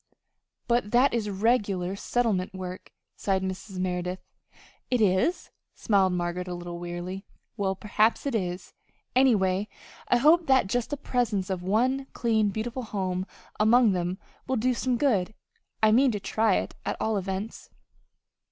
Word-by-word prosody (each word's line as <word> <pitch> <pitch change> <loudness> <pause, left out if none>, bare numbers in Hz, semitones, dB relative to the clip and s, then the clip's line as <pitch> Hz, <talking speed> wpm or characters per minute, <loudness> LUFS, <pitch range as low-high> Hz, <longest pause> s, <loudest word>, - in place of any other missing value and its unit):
"But 240 -3 +1
that 255 +2 +4
is 220 -3 -1
regular 200 -3 0
settlement 200 -4 -1
work," 185 -1 -7 0.2
sighed 190 -1 0
Mrs. 190 +1 -5
Merideth. 180 0 -2 0.7
"Is 220 - +2
it?" - - -32 0.2
smiled 195 -3 +2
Margaret, 175 +1 -2
a 180 - -4
little 175 0 -7
wearily. 175 +2 -5 0.3
"Well, 195 -3 -1
perhaps 215 +5 +1
it 280 - -1
is. 180 -4 -3 0.4
Anyway, 205 -7 +3 0.4
I 245 - +4
hope 320 +6 +4
that 265 -4 +4
just 235 +4 -1
the 290 - -3
presence 225 -8 -1
of 185 -2 -2
one 250 +8 +1
clean, 220 -3 +1
beautiful 230 +5 -4
home 190 -4 -3 0.3
among 225 +1 +5
them 180 0 -1 0.3
will 260 - 0
do 250 +3 +2
some 250 0 0
good. 220 -7 +1 0.5
I 215 - +6
mean 260 +5 +5
to 205 - -2
try 215 +1 +1
it, - - -2
at - - -3
all 220 0 0
events." 195 +2 -4
205 Hz, 150 wpm, -27 LUFS, 185-240 Hz, 0.7 s, I